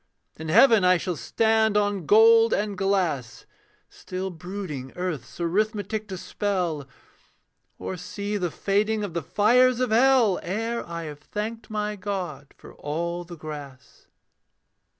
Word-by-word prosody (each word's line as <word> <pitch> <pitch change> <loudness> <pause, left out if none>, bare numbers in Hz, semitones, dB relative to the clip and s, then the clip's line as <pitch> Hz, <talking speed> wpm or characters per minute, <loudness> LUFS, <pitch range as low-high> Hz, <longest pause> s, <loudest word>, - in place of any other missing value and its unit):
In 160 0 -7
heaven 225 +2 +6
I 180 0 +5
shall 180 0 -3
stand 220 - +2
on 205 -5 0
gold 225 +1 +6
and 205 0 -1
glass, 185 - -1 0.4
Still 185 +1 -6
brooding 170 -6 -6
earth's 180 -7 -5
arithmetic 210 +4 -1
to 190 -2 -6
spell; 175 -8 -2 0.9
Or 185 - -5
see 205 +4 -5
the 180 -4 -1
fading 210 +4 0
of 200 -5 -4
the 170 - -1
fires 245 +6 +3
of 255 -3 0
hell 240 -4 +4
Ere 225 +6 -2
I 170 0 -5
have 150 -2 -8
thanked 215 +8 -5
my 210 -1 -2
God 185 -8 -5
for - - -14
all 170 +4 -3
the 170 0 -10
grass. 145 -4 -10
195 Hz, 135 wpm, -25 LUFS, 170-215 Hz, 0.9 s, heaven